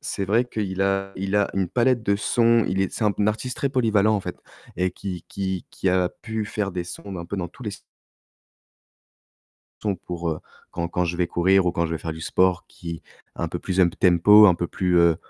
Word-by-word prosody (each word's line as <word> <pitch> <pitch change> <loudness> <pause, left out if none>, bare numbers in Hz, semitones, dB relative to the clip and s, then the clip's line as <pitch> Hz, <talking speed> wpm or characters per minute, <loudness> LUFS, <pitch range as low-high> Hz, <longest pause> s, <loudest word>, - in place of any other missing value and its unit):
c'est 140 -9 -3
vrai 115 +6 +2
qu'il 100 -5 -4
a 95 0 0
il 100 +2 -1
a 100 - +2
une 95 -3 0
palette 125 -1 +2
de 100 -1 +1
sons, 115 +1 +3
il 95 +1 0
est 95 - 0
c'est 110 - -2
un 105 0 +1
artiste 120 +4 -2
très 140 - 0
polyvalent, 110 -5 +2
en 100 - 0
fait, 90 - -6 0.4
et 90 +1 +1
qui 90 -3 -7
qui 95 -2 -3
qui 95 - -2
a 90 -1 +2
pu 110 -2 -3
faire 105 -3 -3
des 90 -1 -3
sons 95 +2 -8
un 85 - -6
peu 100 - -5
dans 85 -2 -3
tous 125 - -15
les 105 - -3
se 95 - -10 2.0
son 100 -3 0
pour, 85 -1 -5
heu, 75 - -4 0.3
quand 85 -1 -3
quand 90 +1 0
je 85 0 -2
vais 90 -1 +1
courir, 95 +3 +3
ou 85 - +2
quand 85 -2 0
je 80 - -5
vais 80 - -2
faire 80 - -4
du 80 - -9
sport, 95 +2 +1
qui, 85 -2 -8 0.3
un - - -2
peu - - -4
plus 95 0 -1
um 90 - +6
tempo, 95 +5 +6
un 90 - +5
peu 85 - -2
plus, 90 0 0
heu, 85 -2 +5
95 Hz, 230 wpm, -24 LUFS, 90-105 Hz, 2.0 s, um